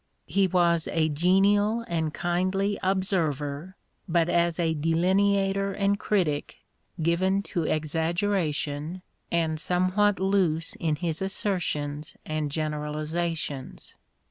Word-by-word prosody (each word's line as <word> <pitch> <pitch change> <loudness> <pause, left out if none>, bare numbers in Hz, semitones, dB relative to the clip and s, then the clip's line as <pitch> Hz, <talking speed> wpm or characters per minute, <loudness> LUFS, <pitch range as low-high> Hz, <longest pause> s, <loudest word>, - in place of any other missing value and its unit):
He 195 -1 +2
was 170 -2 +2
a 160 -1 +1
genial 200 +8 +3
and 160 -2 -1
kindly 185 +5 0
observer, 175 -4 -1 0.3
but 170 0 +2
as 170 -1 +2
a 165 -2 +1
delineator 195 +5 +2
and 200 +1 +1
critic 170 -9 0 0.4
given 185 +4 +1
to 170 -3 0
exaggeration 160 0 -1 0.3
and 160 -2 0
somewhat 185 +5 +2
loose, 185 -4 +1
in 160 -2 0
his 165 0 -2
assertions 160 -7 -2
and 155 -1 -2
generalisations. 155 -1 -3
170 Hz, 100 wpm, -26 LUFS, 155-195 Hz, 0.4 s, genial